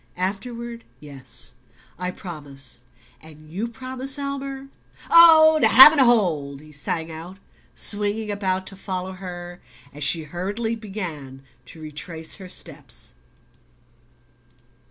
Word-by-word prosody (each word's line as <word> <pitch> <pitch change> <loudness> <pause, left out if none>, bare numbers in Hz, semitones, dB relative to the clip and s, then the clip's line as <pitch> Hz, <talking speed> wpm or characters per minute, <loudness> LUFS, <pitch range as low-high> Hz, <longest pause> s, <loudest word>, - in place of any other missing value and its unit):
"Afterward 235 +5 -5 0.2
yes. 135 -5 -1 0.5
I 180 0 -2
promise. 140 -9 -8 0.4
And 155 -1 -16
YOU 205 +7 -3
promise, 260 +3 -2
Elmer?" 275 -1 -5 0.4
"Oh, 320 -2 +8
to 225 - +7
have 260 +6 +11
and 315 - 0
to 265 - +6
hold!" 160 - +1
he 155 +1 -16
sang 160 +3 -4
out, 165 +4 -10 0.4
swinging 210 +1 -1
about 190 -2 -2
to 195 - -7
follow 185 -1 -5
her 175 -1 -9 0.3
as 145 +1 -6
she 160 +3 +2
hurriedly 200 +9 -4
began 170 -11 -8 0.2
to 165 - -13
retrace 160 +2 -5
her 185 -2 -11
steps. - - -5
185 Hz, 120 wpm, -22 LUFS, 155-235 Hz, 0.5 s, have